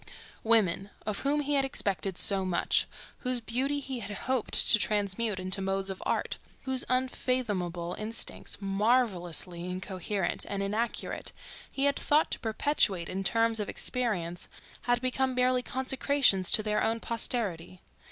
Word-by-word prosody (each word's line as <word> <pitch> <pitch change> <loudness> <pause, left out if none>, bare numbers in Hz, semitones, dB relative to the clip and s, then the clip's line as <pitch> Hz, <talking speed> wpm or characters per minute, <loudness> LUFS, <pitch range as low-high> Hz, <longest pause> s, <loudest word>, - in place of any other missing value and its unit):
Women—of 210 -1 +1
whom 290 +2 +1
he 290 0 -1
had 275 -1 +3
expected 195 -8 -1
so 195 -2 +3
much; 185 -2 +1 0.3
whose 250 -1 0
beauty 260 +5 0
he 265 -3 -4
had 205 -2 -6
hoped 255 +1 -1 0.2
to 215 - +6
transmute 210 0 0
into 185 +1 0
modes 195 0 -1
of 190 - -8
art; - - -1 0.2
whose 260 -1 +1
unfathomable 210 -9 -1
instincts, 220 +2 -3
marvellously 195 -5 0
incoherent 185 +1 -3
and 200 0 -2
inarticulate, 220 +4 -2 0.4
he 275 - -1
had 280 - +3
thought 300 +2 +2
to - - 0
perpetuate 220 - +1
in 195 +1 -3
terms 225 +2 +2
of 210 - -2
experience—had 235 +2 -2
become 260 0 0
merely 250 0 +3
consecrations 260 -6 +2
to 215 - +4
their 210 0 0
own 225 +1 +1
posterity. 205 -7 -2
215 Hz, 135 wpm, -29 LUFS, 190-255 Hz, 0.4 s, to